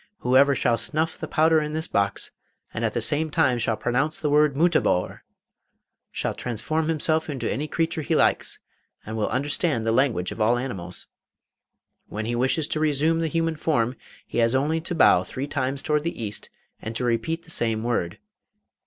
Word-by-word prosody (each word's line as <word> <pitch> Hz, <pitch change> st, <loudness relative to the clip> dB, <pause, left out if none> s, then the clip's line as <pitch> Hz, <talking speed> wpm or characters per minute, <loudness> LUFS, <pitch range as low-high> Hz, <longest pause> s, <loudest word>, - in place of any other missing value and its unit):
Whoever 135 Hz, +3 st, +4 dB
shall 120 Hz, -4 st, +1 dB
snuff 160 Hz, +2 st, +1 dB
the -, -, -5 dB
powder 160 Hz, 0 st, +3 dB
in 150 Hz, 0 st, -4 dB
this 160 Hz, +1 st, 0 dB
box, 100 Hz, 0 st, -1 dB, 0.4 s
and -, -, -3 dB
at -, -, -1 dB
the -, -, 0 dB
same 155 Hz, +2 st, +2 dB
time 130 Hz, -4 st, +2 dB
shall 115 Hz, -2 st, 0 dB
pronounce 130 Hz, +8 st, -1 dB
the 150 Hz, -, -1 dB
word 150 Hz, -1 st, +4 dB
"Mutabor!" 160 Hz, -, +1 dB, 1.0 s
can -, -, -1 dB
transform 155 Hz, +7 st, -2 dB
himself 160 Hz, 0 st, 0 dB
into 130 Hz, -6 st, -3 dB
any 150 Hz, +3 st, -2 dB
creature 160 Hz, 0 st, -1 dB
he -, -, 0 dB
likes, -, -, +1 dB, 0.5 s
and 110 Hz, -, -5 dB
will 110 Hz, -2 st, -1 dB
understand 140 Hz, -1 st, 0 dB
the 115 Hz, -, +2 dB
language 115 Hz, -8 st, +1 dB
of 115 Hz, -, -6 dB
all 115 Hz, +3 st, +3 dB
animals. 95 Hz, -9 st, -5 dB, 1.0 s
When 110 Hz, +1 st, -5 dB
he 120 Hz, -, -2 dB
wishes 130 Hz, +5 st, +1 dB
to 155 Hz, -, -1 dB
resume 155 Hz, +2 st, +2 dB
the 165 Hz, -, 0 dB
human 165 Hz, 0 st, -1 dB
form, 130 Hz, -6 st, 0 dB, 0.3 s
he -, -, -3 dB
has 115 Hz, +2 st, +3 dB
only 155 Hz, +5 st, +1 dB
to 175 Hz, +2 st, -3 dB
bow 90 Hz, -, +5 dB
three 130 Hz, +8 st, -5 dB
times 135 Hz, -1 st, -2 dB
towards 150 Hz, -1 st, +1 dB
the 170 Hz, -, -3 dB
east, 105 Hz, -1 st, -4 dB, 0.3 s
and 110 Hz, +1 st, -6 dB
to 125 Hz, -, -2 dB
repeat 160 Hz, +8 st, -1 dB
the 165 Hz, -, -6 dB
same 115 Hz, -6 st, 0 dB
word. 105 Hz, -8 st, -1 dB
140 Hz, 185 wpm, -24 LUFS, 115-155 Hz, 1.0 s, bow